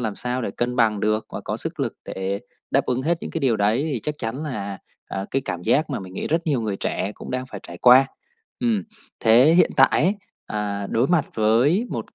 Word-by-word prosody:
làm 110 -4 -2
sao 125 0 -2
để - - -2
cân 120 +4 -2
bằng 110 -4 +3
được 110 +1 0
và - - -4
có - - -4
sức - - -5
lực - - -1
để 95 +1 -3 0.3
đáp 135 +1 +2
ứng 125 +1 0
hết 165 +3 +1
những - - -6
cái 165 - -3
điều 125 -5 +2
đấy 110 +9 +1
thì 120 - -2
chắc 150 - -2
chắn 120 +6 -4
là, 100 -10 -4 0.3
ờ, 95 0 -4
cái 135 0 0
cảm 90 -2 -4
giác 155 - +2
mà 135 - -2
mình 95 -1 -10
nghĩ - - -3
rất 165 +2 0
nhiều 140 -6 +1
người 105 -3 -2
trẻ 100 +1 -2
cũng - - -9
đang 130 0 -2
phải 105 -6 -8
trải 85 - -10
qua. 130 +4 +7 0.5
Ừm. 230 -4 +1 0.4
Thế 120 +7 +6
hiện - - +5
tại 135 - +7
ấy, 185 +6 +3 0.3
ờ, 100 -1 -3
đối 120 +4 +2
mặt 175 -4 +2
với 125 - +3
một - - -5
125 Hz, 235 wpm, -23 LUFS, 105-140 Hz, 0.5 s, qua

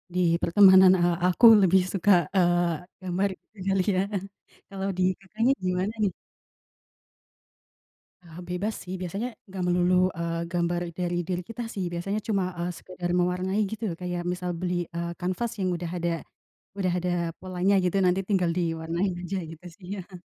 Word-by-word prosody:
di - - +1 0.2
pertemanan, 190 +1 +7
eee, 175 0 +3
aku 185 +6 +4 0.2
lebih 190 0 +5
suka, 195 +2 +2 0.2
eee, 175 -2 +3 0.3
gambar 185 +2 0 0.4
kali 195 -1 +2
ya, 185 - +2 0.7
kalau 195 0 -4
di 185 - +2 0.2
Kakaknya 220 +6 0
gimana 185 +4 0
nih? 195 - +2 2.1
Ah 170 -1 -13
bebas 200 +5 -2
sih 185 - -6
biasanya 195 +7 -3 0.2
enggak 190 -1 -5
melulu, 180 +1 +2 0.2
eee, 170 0 -2
gambar 175 0 0 0.2
dari 175 -1 -1
diri 180 -1 -2
kita 230 +1 -5
sih. 190 -3 -2
Biasanya 195 +5 -2
cuma, 200 -4 +1
eee, 175 +1 -2
sekedar 180 -1 -6
mewarnai 180 +2 0
gitu. 220 +3 -6 0.2
Kayak 175 -1 -3
misal 180 0 -4
beli, 175 0 -2
eee, 170 0 -3
kanvas 185 +6 -2
yang 185 -1 +1
udah 170 -1 -4
ada 170 0 0 0.7
udah 185 -2 +1
ada 180 0 -1 0.3
polanya 185 +1 0
gitu, 180 +2 0
nanti 180 +1 +3
tinggal 185 -4 +1
diwarnain 170 +2 -1
aja 185 +2 -3
gitu 165 +2 -11
sih 185 - -13
ya. 180 0 -11
180 Hz, 155 wpm, -26 LUFS, 175-195 Hz, 2.1 s, pertemanan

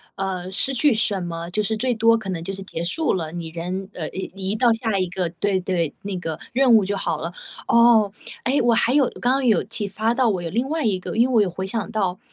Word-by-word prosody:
呃， 190 -2 -3
失 265 +8 +1
去 275 +2 +3
什 210 -4 0
么， 170 0 -5
就 210 +3 0
是 220 +2 -1
最 245 +1 0
多 230 +1 +4
可 220 -4 -7
能 165 -3 -4
就 195 - -4
是 195 - -7
结 170 -3 -5
束 315 - 0
了， 160 -4 -3
你 170 -1 -5
人 180 +4 -5
呃 160 -3 -5
移 190 - -5
移 195 +1 -3
到 240 -1 +4
下 225 -4 -1
一 185 - 0
个 180 -1 -2
对 190 +2 -1
对， 175 -4 -1
那 195 -2 -4
个 160 -3 -4
任 255 -1 +5
务 215 - +5
就 200 +1 -1
好 - - -2
了。 165 - -3 0.4
哦， 235 -3 +5 0.3
诶， 270 +3 +2
我 235 -1 +3
还 235 +1 +2
有 280 -3 +4
刚 245 - +2
刚 265 0 +1
有 220 - +4
启 210 -1 -4
发 220 +3 0
到 255 0 +2
我 195 -5 0
有 165 - -3
另 240 +7 -1
外 315 0 -1
一 200 -5 +1
个 - - -6
因 235 +3 +3
为 255 - -1
我 220 - +6
有 195 - +1
回 190 +2 -5
想 215 0 -3
到， 195 -5 -1
200 Hz, 280 characters per minute, -22 LUFS, 180-235 Hz, 0.4 s, 我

